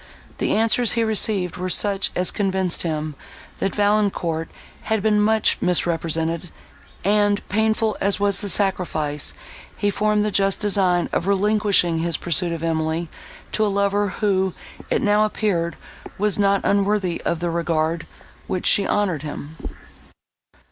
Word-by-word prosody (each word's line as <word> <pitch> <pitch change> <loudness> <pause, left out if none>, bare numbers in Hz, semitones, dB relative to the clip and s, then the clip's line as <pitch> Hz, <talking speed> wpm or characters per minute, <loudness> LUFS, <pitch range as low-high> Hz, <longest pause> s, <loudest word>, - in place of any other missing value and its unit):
The - - +1
answers 225 +1 +3
he 230 - +1
received 210 -4 +1
were 185 +1 -3
such 200 +2 +1
as 180 0 0
convinced 190 -3 0
him, 155 -2 -2 0.5
that 195 - -1
Valancourt 200 -6 +1 0.4
had 220 -2 0
been 210 -1 +3
much 220 +1 +2
misrepresented, 165 -1 0 0.5
and, 205 +1 +2
painful 220 +1 +1
as 200 +1 +1
was 200 -1 +1
the 205 - -3
sacrifice, 160 -7 -1 0.4
he 205 -1 +1
formed 210 +1 +1
the 210 - 0
just 195 -1 +1
design 190 -4 +2
of 175 - -1
relinquishing 200 -4 +2
his 170 -1 0
pursuit 175 0 +2
of 165 -1 -4
Emily 160 0 -1 0.4
to 215 - +1
a - - +2
lover, 200 0 +1
who, 190 -1 0 0.3
it - - 0
now 210 0 +4
appeared, 195 -6 -1 0.4
was 210 0 0
not 200 -1 +3
unworthy 200 -3 +1
of 170 - -1
the 170 0 -2
regard, 165 0 -1 0.4
with 185 - -2
which - - -11
she 200 - +4
honoured 190 -8 0
him. 150 0 -7
195 Hz, 145 wpm, -22 LUFS, 170-205 Hz, 0.5 s, now